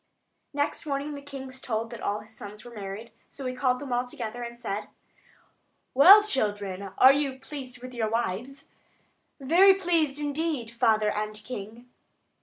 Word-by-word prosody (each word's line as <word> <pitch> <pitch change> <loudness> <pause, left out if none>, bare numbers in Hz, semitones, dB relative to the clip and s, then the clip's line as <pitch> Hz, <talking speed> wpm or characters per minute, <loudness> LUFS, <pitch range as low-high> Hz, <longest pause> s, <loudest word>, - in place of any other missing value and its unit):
Next 290 +2 -2
morning 285 +1 -2
the 285 - -7
king 275 -1 -8
was 260 0 -11
told 225 -1 -3
that 235 - -8
all 205 +1 -1
his 220 +1 -16
sons 210 0 -10
had 240 -1 -11
got 215 - -8
married; 200 +4 -7 0.2
so 275 - -9
he 255 - -2
called 255 -1 +1
them 270 -3 -4
all 245 +1 0
together, 240 -1 -6
and 235 0 -6
said: 210 -4 -4 1.1
"Well 380 +11 +9
children, 205 - -1 0.2
are 260 +1 +8
you 280 -1 0
all - - -15
pleased 255 -3 -8
with 255 0 -8
your 225 -3 -1
wives?" 235 +5 -3 0.7
"Very 355 +8 +6
pleased 335 -7 +1
indeed, 290 -5 -2
father 220 -3 +2
and 215 0 -3
king." 220 +1 -8
250 Hz, 175 wpm, -27 LUFS, 220-280 Hz, 1.1 s, Well